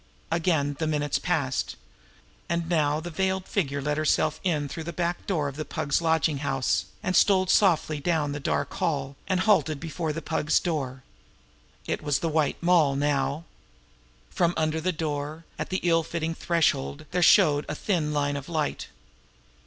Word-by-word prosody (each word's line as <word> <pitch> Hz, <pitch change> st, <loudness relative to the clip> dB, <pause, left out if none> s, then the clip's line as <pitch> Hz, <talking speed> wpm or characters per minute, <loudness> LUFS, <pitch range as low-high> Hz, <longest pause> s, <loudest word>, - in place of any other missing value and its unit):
Again 160 Hz, -4 st, +1 dB
the 160 Hz, -, 0 dB
minutes 145 Hz, -2 st, 0 dB
passed. 145 Hz, -7 st, -1 dB, 0.7 s
And 170 Hz, -1 st, -1 dB
now 155 Hz, -3 st, +1 dB
the 175 Hz, +2 st, -6 dB
veiled 190 Hz, +2 st, -1 dB
figure 140 Hz, -8 st, -1 dB
let 150 Hz, +1 st, -1 dB
herself 155 Hz, 0 st, +1 dB
in 155 Hz, -6 st, 0 dB
through 160 Hz, +3 st, -6 dB
the 170 Hz, -, -4 dB
back 175 Hz, 0 st, -2 dB
door 160 Hz, -7 st, 0 dB
of 140 Hz, 0 st, -6 dB
the 155 Hz, -, -2 dB
Pug's 145 Hz, 0 st, -1 dB
lodging 160 Hz, -3 st, +1 dB
house, 130 Hz, -10 st, 0 dB, 0.2 s
and 185 Hz, -, 0 dB
stole 190 Hz, +1 st, +5 dB
softly 170 Hz, -5 st, +3 dB
down 155 Hz, -2 st, 0 dB
the 145 Hz, -, -4 dB
dark 140 Hz, -, -1 dB
hall, 140 Hz, -5 st, -2 dB
and 185 Hz, 0 st, +1 dB
halted 160 Hz, -8 st, +3 dB
before 160 Hz, 0 st, -3 dB
the 160 Hz, -, -4 dB
Pug's 155 Hz, -1 st, +1 dB
door. 135 Hz, -6 st, -3 dB, 0.8 s
It -, -, -2 dB
was 145 Hz, -2 st, +1 dB
the 165 Hz, -, -2 dB
White 155 Hz, -2 st, +1 dB
Moll 165 Hz, -6 st, +4 dB
now. 140 Hz, +1 st, 0 dB, 0.9 s
From 175 Hz, -2 st, +1 dB
under 155 Hz, 0 st, 0 dB
the 185 Hz, +3 st, +1 dB
door, 155 Hz, -1 st, -4 dB
at -, -, -3 dB
the 185 Hz, -, -1 dB
ill 165 Hz, -1 st, +3 dB
fitting 165 Hz, 0 st, -3 dB
threshold, 155 Hz, -, 0 dB
there 180 Hz, 0 st, 0 dB
showed 155 Hz, -5 st, +5 dB
a 150 Hz, -, -2 dB
thin 160 Hz, -4 st, -1 dB
line 145 Hz, -1 st, 0 dB
of 140 Hz, +2 st, -8 dB
light. 155 Hz, -3 st, -2 dB
155 Hz, 170 wpm, -26 LUFS, 145-170 Hz, 0.9 s, stole